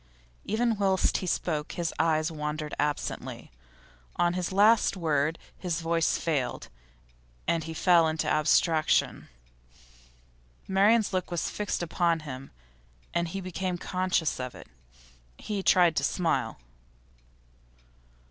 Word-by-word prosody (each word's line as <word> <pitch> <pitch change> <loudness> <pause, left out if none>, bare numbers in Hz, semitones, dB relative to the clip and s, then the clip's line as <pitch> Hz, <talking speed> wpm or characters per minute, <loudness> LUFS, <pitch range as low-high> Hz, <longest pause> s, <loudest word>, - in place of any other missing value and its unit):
Even 225 +1 0
whilst 195 -2 +2
he 185 - -4
spoke 155 -3 -2
his 170 -2 -2
eyes 160 0 +2
wandered 150 0 -4
absently. 150 0 -3 0.6
On 175 0 +2
the 180 -1 -2
last 210 0 +4
word 160 -2 0 0.2
his 175 -3 -2
voice 165 0 +1
failed, 145 -7 -2 0.8
and 165 -2 0
he 160 0 -6
fell 170 -1 +4
into 160 0 -1
abstraction. 155 +1 +2 1.4
Marian's 200 +2 +3
look 185 -1 -1
was 175 -2 -2
fixed 210 -4 -2
upon 170 -1 +1
him, 135 -3 -8 0.6
and 170 0 0
he 195 +4 -5
became 185 0 -3
conscious 180 -4 -1
of 125 -1 -5
it. - - -11 0.7
He 205 -2 -4
tried 175 -3 +4
to - - +1
smile. 165 -10 0
170 Hz, 120 wpm, -28 LUFS, 155-185 Hz, 1.4 s, last